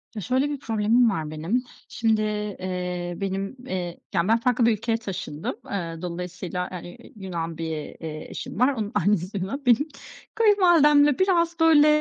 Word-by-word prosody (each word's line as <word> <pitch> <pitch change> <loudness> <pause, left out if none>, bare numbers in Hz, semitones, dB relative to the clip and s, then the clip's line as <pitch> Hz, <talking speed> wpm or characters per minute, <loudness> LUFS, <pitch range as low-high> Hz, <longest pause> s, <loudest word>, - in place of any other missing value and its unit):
Ya, 210 - -4
şöyle 260 +7 +1
bir 290 -1 -4
problemim 225 0 +3
var 160 -7 -3
benim, 170 +11 -1 0.3
şimdi, 220 -2 +1 0.4
eee, 180 -1 -3
benim, 195 +2 -3
eee 180 -6 -4
yani, 170 0 +1
ben 225 +1 +4
farklı 245 0 +2
bir 235 - +5
ülkeye 225 +1 0
taşındım. 185 -7 -5 0.2
Eee, 170 -4 -3
dolayısıyla, 180 0 -4
aaa, 180 - -6
eee, 175 +8 -11
iii, - - -16
Yunan 170 -5 -5
bir, 165 0 -3
eee, 155 0 -6
eşim - - -6
var, 255 +3 +4
onun 215 -4 -3
annesi 195 +1 +1
Yunan. 200 +10 -3
Benim 250 +5 +4 0.5
kayınvalidemle 330 - +5
biraz 340 -3 +2
böyle, 320 -2 +6
205 Hz, 165 wpm, -25 LUFS, 180-255 Hz, 0.5 s, böyle